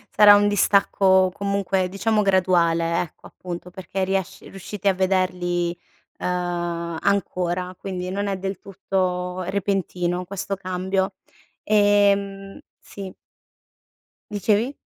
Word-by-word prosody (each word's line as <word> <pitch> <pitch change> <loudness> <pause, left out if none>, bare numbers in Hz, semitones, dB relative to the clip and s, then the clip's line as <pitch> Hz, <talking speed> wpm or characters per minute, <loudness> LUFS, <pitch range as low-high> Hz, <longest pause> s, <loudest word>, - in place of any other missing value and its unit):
sarà 205 -1 +9
un 205 0 +4
distacco 195 -2 +3
comunque, 195 -2 -1
diciamo 210 +2 +1
graduale 170 -3 +2
ecco, 175 - -9
appunto 180 0 -8
perché 190 +1 -4
riesci 190 -1 -2
riuscite 195 +1 -6
a 195 - +5
vederli, 180 -2 0 0.4
ehm, 175 -2 -2
ancora, 180 -2 -1
quindi 185 -2 -4
non 200 +1 -2
è 195 - -1
del 195 +1 -4
tutto 185 -2 -2
repentino 180 -2 -1
questo 195 +1 -4
cambio. 190 +1 -1 0.5
Ehm 200 -1 +2 0.2
sì. 195 -2 -9 1.2
Dicevi? 215 +6 +1
190 Hz, 105 wpm, -23 LUFS, 180-200 Hz, 1.2 s, sarà